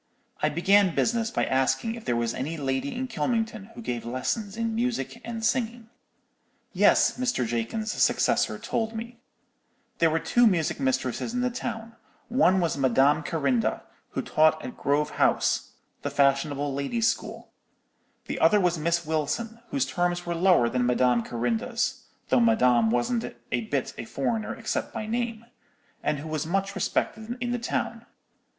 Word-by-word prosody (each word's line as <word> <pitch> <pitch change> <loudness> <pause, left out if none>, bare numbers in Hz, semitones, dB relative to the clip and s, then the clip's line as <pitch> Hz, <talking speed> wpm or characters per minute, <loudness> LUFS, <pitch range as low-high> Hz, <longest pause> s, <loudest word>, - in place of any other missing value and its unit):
"I - - +3
began 190 +2 +3
business 230 -1 +1
by - - 0
asking 135 +11 +1
if 230 -1 -9
there 120 - +1
was 115 -1 0
any 150 +6 -4
lady 135 -1 -2
in 260 +1 -2
Kylmington 225 -3 -1
who 235 - -8
gave 120 - -3
lessons 195 - -3
in 230 -1 -1
music 235 0 -2
and 225 -1 -4
singing. 230 -2 -1 0.8
"'Yes,' - - +4
Mr. 245 - 0
Jakins's 120 - -2
successor - - +2
told 225 -1 -2
me, 235 +1 -7 0.8
'there 165 - +5
were 160 - +1
two 240 +8 +3
music 170 -8 +1
mistresses 130 - -1
in 245 - 0
the 250 0 0
town—one 225 -3 -1
was 170 -5 0
Madame 135 +3 +4
Carinda, 140 -6 0 0.3
who - - -2
taught 155 0 +3
at 125 - -7
Grove 145 +2 0
House, - - +1 0.3
the - - -2
fashionable 140 0 +1
ladies' 220 - 0
school; - - -3 0.7
the - - -4
other 210 - +5
was 175 -3 +1
Miss 170 +2 0
Wilson, 160 +10 -2
whose 275 -2 0
terms 175 0 -1
were 170 - -2
lower 170 -8 +4
than 125 +1 0
Madame 125 0 +3
Carinda's—though 230 - -2
Madame 125 - +4
wasn't 120 - -1 0.2
a 120 - +1
bit 135 +2 -2
a - - -4
foreigner 215 - -2
except 225 -1 -3
by 215 - -3
name—and 230 -9 -5
who 145 +3 -7
was 155 0 -3
much 195 +3 -1
respected 220 +4 -2
in 245 0 -2
the 245 - -1
town. 230 0 -3
180 Hz, 155 wpm, -26 LUFS, 140-230 Hz, 0.8 s, there